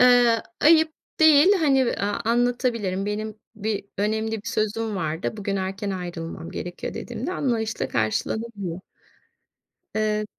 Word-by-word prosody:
Eee, 245 Hz, -2 st, +6 dB, 0.2 s
ayıp 315 Hz, 0 st, +6 dB, 0.3 s
değil, 315 Hz, +4 st, +7 dB
hani 270 Hz, -5 st, +4 dB
v -, -, 0 dB
aaa, 205 Hz, +1 st, -1 dB
anlatabilirim. 235 Hz, -5 st, +1 dB
Benim 215 Hz, +1 st, -3 dB, 0.2 s
bir 215 Hz, -1 st, -2 dB
önemli 220 Hz, +2 st, 0 dB
bir -, -, -15 dB
sözüm 220 Hz, -1 st, -1 dB
vardı. 165 Hz, +4 st, -2 dB
Bugün 200 Hz, -1 st, -2 dB
erken 195 Hz, +1 st, -3 dB
ayrılmam 170 Hz, -3 st, -5 dB
gerekiyor 175 Hz, 0 st, -5 dB
dediğimde 295 Hz, +10 st, -4 dB
anlayışla 230 Hz, -9 st, -1 dB
karşılanabiliyor. 185 Hz, -, -2 dB, 1.2 s
Eee, 215 Hz, 0 st, +1 dB
215 Hz, 120 wpm, -24 LUFS, 195-240 Hz, 1.2 s, değil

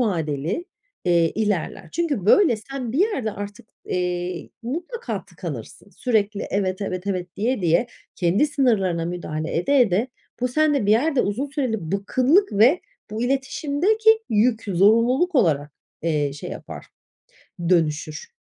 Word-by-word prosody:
vadeli, 165 Hz, -, -1 dB, 0.4 s
eee, 170 Hz, -2 st, +3 dB
ilerler. 200 Hz, -4 st, -2 dB
Çünkü 290 Hz, -, -1 dB
böyle 320 Hz, -, +5 dB
sen 245 Hz, +1 st, -6 dB
bir 280 Hz, -, -1 dB
yerde 275 Hz, -, +1 dB
artık, 205 Hz, +1 st, -8 dB, 0.2 s
eee, 180 Hz, -1 st, -2 dB
mutlaka 350 Hz, -, -4 dB
tıkanırsın. -, -, -8 dB
Sürekli, 210 Hz, -4 st, 0 dB
"Evet, 190 Hz, -1 st, -1 dB
evet, 185 Hz, 0 st, -4 dB
evet." 180 Hz, -2 st, -3 dB
diye 235 Hz, +2 st, 0 dB
diye, 170 Hz, +8 st, +3 dB, 0.3 s
kendi 190 Hz, -, +2 dB
sınırlarına 200 Hz, -, +1 dB
müdahale 165 Hz, -3 st, -4 dB
ede 265 Hz, +11 st, +3 dB
ede 220 Hz, +2 st, +2 dB, 0.3 s
bu 250 Hz, -, +1 dB
sende 295 Hz, -4 st, +2 dB
bir -, -, +3 dB
yerde 270 Hz, +3 st, +3 dB
uzun 230 Hz, +8 st, -1 dB
süreli 235 Hz, -, -3 dB
bıkkınlık 260 Hz, -, +2 dB
ve 240 Hz, -, +5 dB, 0.3 s
bu 220 Hz, +2 st, -3 dB
iletişimdeki 310 Hz, -, +2 dB
yük, 225 Hz, +1 st, +2 dB
zorunluluk 230 Hz, -, +3 dB
olarak, 150 Hz, -, +2 dB, 0.3 s
eee, 150 Hz, -4 st, 0 dB
şey 145 Hz, -, -7 dB
yapar, -, -, -8 dB, 0.8 s
dönüşür. 155 Hz, -, 0 dB
215 Hz, 130 wpm, -23 LUFS, 180-270 Hz, 0.8 s, böyle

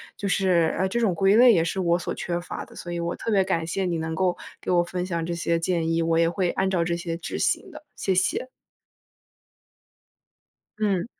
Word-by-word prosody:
就 200 Hz, -, -4 dB
是， 180 Hz, -4 st, +2 dB
呃， 190 Hz, +2 st, +1 dB
这 235 Hz, +5 st, -1 dB
种 205 Hz, -7 st, +1 dB
归 195 Hz, +4 st, +4 dB
类 245 Hz, +1 st, +8 dB
也 170 Hz, -7 st, +3 dB
是 170 Hz, +3 st, -2 dB
我 170 Hz, -1 st, +2 dB
所 175 Hz, -, -4 dB
缺 175 Hz, 0 st, -3 dB
乏 175 Hz, -, -6 dB
的， -, -, -17 dB
所 175 Hz, -, -7 dB
以 170 Hz, -, -3 dB
我 170 Hz, 0 st, -2 dB
特 230 Hz, -, -4 dB
别 195 Hz, -2 st, +4 dB
感 175 Hz, -4 st, -1 dB
谢 185 Hz, +3 st, -2 dB
你 170 Hz, -2 st, -1 dB
能 160 Hz, 0 st, -3 dB
够 180 Hz, +2 st, 0 dB, 0.2 s
给 -, -, -6 dB
我 175 Hz, -1 st, +4 dB
分 180 Hz, +1 st, -4 dB
享 170 Hz, -3 st, -2 dB
这 170 Hz, -, -3 dB
些 170 Hz, 0 st, 0 dB
建 165 Hz, -1 st, 0 dB
议， 165 Hz, 0 st, +1 dB
我 165 Hz, 0 st, +2 dB
也 165 Hz, 0 st, +4 dB
会 180 Hz, 0 st, 0 dB
按 190 Hz, -, 0 dB
照 180 Hz, -3 st, +1 dB
这 170 Hz, 0 st, -1 dB
些 170 Hz, -1 st, -4 dB
执 170 Hz, -, -5 dB
行 -, -, 0 dB
的， -, -, -11 dB
谢 190 Hz, -, 0 dB
谢。 185 Hz, +7 st, 0 dB, 2.3 s
嗯。 200 Hz, -3 st, 0 dB
175 Hz, 240 characters per minute, -25 LUFS, 170-190 Hz, 2.3 s, 类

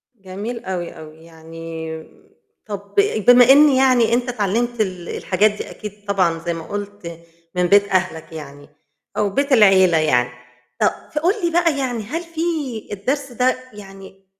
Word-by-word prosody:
جميل 205 Hz, +4 st, -7 dB
أوي، 180 Hz, -2 st, -4 dB
أوي، 155 Hz, 0 st, -12 dB
يعني 160 Hz, 0 st, -8 dB, 0.6 s
طب 200 Hz, -1 st, -8 dB, 0.3 s
بما 245 Hz, 0 st, +7 dB
إن 295 Hz, +2 st, +7 dB
يعني 260 Hz, -4 st, +3 dB
أنت 245 Hz, +1 st, 0 dB
اتعلمت 235 Hz, +1 st, -1 dB
ال 185 Hz, -4 st, -3 dB
الحاجات 205 Hz, +3 st, +1 dB
دي 210 Hz, -, -7 dB
أكيد 210 Hz, -1 st, -10 dB
طبعًا- 185 Hz, -5 st, +1 dB
زي 170 Hz, -, -1 dB
ما 165 Hz, -1 st, -7 dB
قُلت- 205 Hz, -5 st, -7 dB, 0.4 s
من 180 Hz, 0 st, +2 dB
بيت 200 Hz, +1 st, +4 dB
أهلك 185 Hz, -4 st, -1 dB
يعني، 145 Hz, -2 st, -10 dB, 0.5 s
أو 210 Hz, -, +1 dB
بيت 280 Hz, +8 st, -1 dB
العيلة 190 Hz, -7 st, +5 dB
يعني 125 Hz, -6 st, +2 dB, 0.5 s
ف -, -, +1 dB, 0.3 s
فقول 335 Hz, +5 st, +2 dB
لي 340 Hz, -, +1 dB
بقى 335 Hz, -3 st, +2 dB
يعني 245 Hz, -4 st, -2 dB
هل 315 Hz, +11 st, -4 dB
في 335 Hz, -1 st, -7 dB, 0.5 s
الدرس 265 Hz, +7 st, -3 dB
ده 250 Hz, +2 st, +1 dB, 0.2 s
يعني، 195 Hz, -1 st, -13 dB
200 Hz, 150 wpm, -20 LUFS, 175-245 Hz, 0.6 s, بما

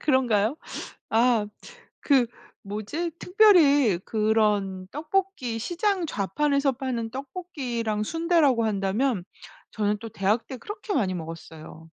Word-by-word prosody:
그런가요? 250 Hz, -3 st, +2 dB, 0.5 s
아 230 Hz, -1 st, +3 dB, 0.6 s
그 270 Hz, -4 st, +4 dB, 0.4 s
뭐지? 215 Hz, -, -4 dB
특별히 300 Hz, -, +5 dB
그런 210 Hz, -4 st, +1 dB
떡볶이 305 Hz, -7 st, -2 dB
시장 360 Hz, -, 0 dB
좌판에서 280 Hz, -, +1 dB
파는 240 Hz, -3 st, -3 dB
떡볶이랑 260 Hz, -, -3 dB
순대라고 325 Hz, -5 st, +2 dB
한다면 205 Hz, +1 st, 0 dB, 0.5 s
저는 210 Hz, -1 st, 0 dB
또 225 Hz, +1 st, -7 dB
대학 205 Hz, +4 st, 0 dB
때 260 Hz, -, -6 dB
그렇게 415 Hz, -, -6 dB
많이 200 Hz, -, +1 dB
먹었어요. 160 Hz, -1 st, -9 dB
235 Hz, 250 characters per minute, -26 LUFS, 210-295 Hz, 0.6 s, 특별히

